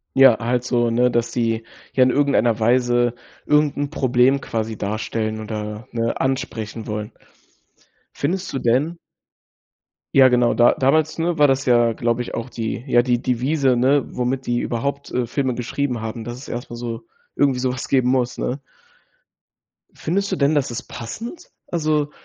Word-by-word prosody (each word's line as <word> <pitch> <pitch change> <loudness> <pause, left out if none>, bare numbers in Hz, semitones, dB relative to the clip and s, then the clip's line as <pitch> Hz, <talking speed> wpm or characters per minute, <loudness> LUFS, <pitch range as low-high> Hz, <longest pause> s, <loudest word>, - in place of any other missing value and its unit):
Ja, 135 -4 +7
halt 120 +1 0
so, 120 -1 +1
ne, 125 +2 +2
dass 120 0 0
die, 115 -2 -1 0.3
ja, 130 - +2
in 125 - +4
irgendeiner 125 -5 +2
Weise 120 +1 +2 0.3
irgend 150 -1 +2
'n 145 0 -1
Problem 130 0 +2
quasi 110 -2 -3
darstellen 110 +1 -3
oder, 105 +1 -6
ne, 115 0 -1
ansprechen 115 -5 -3
wollen. 105 0 -4 1.0
Findest 180 +6 -2
du 135 - -1
denn 135 +9 +1 1.2
ja 135 -1 +8
genau. 125 -1 +3
Da 120 0 +5
damals, 150 +4 +2
ne, 170 +1 0
war 145 -1 +6
das 135 0 +1
ja 120 -2 +4
glaube 115 +2 0
ich - - -9
auch 115 +2 -4
die 115 0 -4
ja, 120 -2 +5
die 120 -1 +1
Devise, 130 +2 +1
ne, 135 +3 +3
womit 125 +2 -2
die 120 0 +1
überhaupt, 140 +5 -3
äh, 125 -1 -1
Filme 130 +1 -1
geschrieben 125 0 -2
haben, 110 +1 -5
dass 120 +1 -6
es 130 - -11
erst 120 +3 -5
mal - - -5
so 115 -1 -6 0.3
irgendwie 135 -3 +2
sowas 130 +1 -2
geben 130 -2 +2
muss, 125 -1 0
ne? 130 - -2 1.3
Findest 200 +5 -2
du - - +1
denn, 145 -1 +2
dass 140 -3 0
ist 120 - -5
passend? 230 - -8 0.2
Also, 155 -3 0
125 Hz, 165 wpm, -21 LUFS, 115-140 Hz, 1.3 s, ja